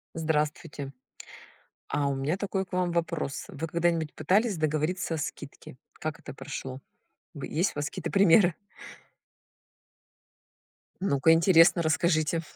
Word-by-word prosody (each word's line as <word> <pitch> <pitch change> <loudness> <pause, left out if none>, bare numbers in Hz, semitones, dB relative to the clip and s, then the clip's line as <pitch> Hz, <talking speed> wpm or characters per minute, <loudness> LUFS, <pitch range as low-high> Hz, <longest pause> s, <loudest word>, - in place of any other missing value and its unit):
Здравствуйте. 150 -2 -2 1.0
А 145 - 0
у 140 - 0
меня 140 +6 -1
такой 195 -1 -2
к 190 - -32
вам 180 -1 0
вопрос. 170 -4 -2
Вы 160 +3 -5
когда-нибудь 165 -1 0
пытались 205 +2 +1
договориться 155 +4 -1
о - - -1
скидке? 145 -3 -7 0.2
Как 155 -1 -5
это - - -9
прошло? 130 0 -7 0.5
Вы - - -6
есть 175 +6 0
у - - -8
вас 145 - -2
какие-то 165 0 -5
примеры? 185 -1 +5 2.5
Ну-ка 160 -4 +3
интересно, 165 +1 +6
расскажите. 160 0 +1
165 Hz, 125 wpm, -28 LUFS, 150-175 Hz, 2.5 s, интересно